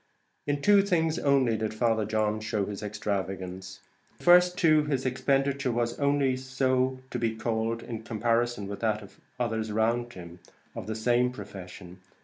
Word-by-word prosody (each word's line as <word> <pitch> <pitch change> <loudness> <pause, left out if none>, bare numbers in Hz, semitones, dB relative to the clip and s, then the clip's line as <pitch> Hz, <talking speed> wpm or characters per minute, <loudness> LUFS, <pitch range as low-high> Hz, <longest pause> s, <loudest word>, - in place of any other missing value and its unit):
In 145 0 -1
two 205 -1 +6
things 165 -4 +1
only 135 -5 +3
did 110 0 -3
Father 110 -1 +1
John 110 0 0
show 110 -2 -1
his 100 0 -6
extravagance; 95 -3 -4 0.3
in - - -32
the - - -17
first, 180 0 +6
too, 155 -2 +4
his 135 -3 -1
expenditure 135 +1 +1
was 120 0 -1
only 140 -2 +2
so 130 0 0
to 125 - -2
be 115 -1 0
called, 115 0 -2
in 115 -2 -6
comparison 115 -1 0
with 100 0 -6
that 110 -2 0
of 100 - -16 0.2
others 110 -2 -1
round 120 +3 0
him, 85 -1 -10 0.4
of - - -6
the 110 - -3
same 120 +2 +2
profession. 90 -5 -10
115 Hz, 165 wpm, -28 LUFS, 105-130 Hz, 0.4 s, two